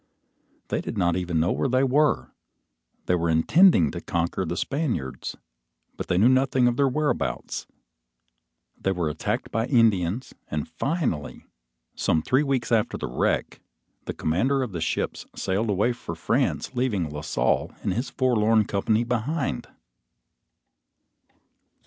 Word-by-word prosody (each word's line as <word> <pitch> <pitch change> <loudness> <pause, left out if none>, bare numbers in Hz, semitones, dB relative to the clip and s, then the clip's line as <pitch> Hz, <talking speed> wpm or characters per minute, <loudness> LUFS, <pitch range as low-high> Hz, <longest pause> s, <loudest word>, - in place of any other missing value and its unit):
They - - -1
did - - -5
not 85 -3 +2
even 90 -3 -1
know 85 +3 +2
where 135 - 0
they 130 +2 +3
were. 145 +3 +2 0.7
They - - +1
were 85 -1 +1
intending 85 - +5
to - - -6
conquer 85 +2 -1
the 85 +2 -3
Spaniards, 125 - -2 0.6
but - - -6
they 90 - +1
knew 105 +6 +5
nothing 130 -1 +3
of 120 - +2
their 140 +2 +3
whereabouts. 150 +3 -2 1.1
They 95 - -1
were 85 -4 -1
attacked 75 - -3
by 115 +2 0
Indians, 110 - +2 0.2
and 75 -1 -3
finally, 85 - -2 0.5
some 80 -1 +1
three 130 +2 +3
weeks 135 -5 -1
after 110 -2 +2
the - - -4
wreck, 60 - -1 0.5
the - - -3
commander 130 - +1
of 120 - -4
the 85 -3 -4
ships 80 - -2
sailed 100 +4 -1
away 105 +5 +2
for 85 -8 -7
France 120 +10 0
leaving 120 -9 0
La 75 0 -5
Salle 60 -5 0
and - - 0
his 120 +7 -2
forlorn 110 -4 +2
company 110 +4 +1
behind! 120 +1 -2
110 Hz, 145 wpm, -25 LUFS, 85-130 Hz, 1.1 s, intending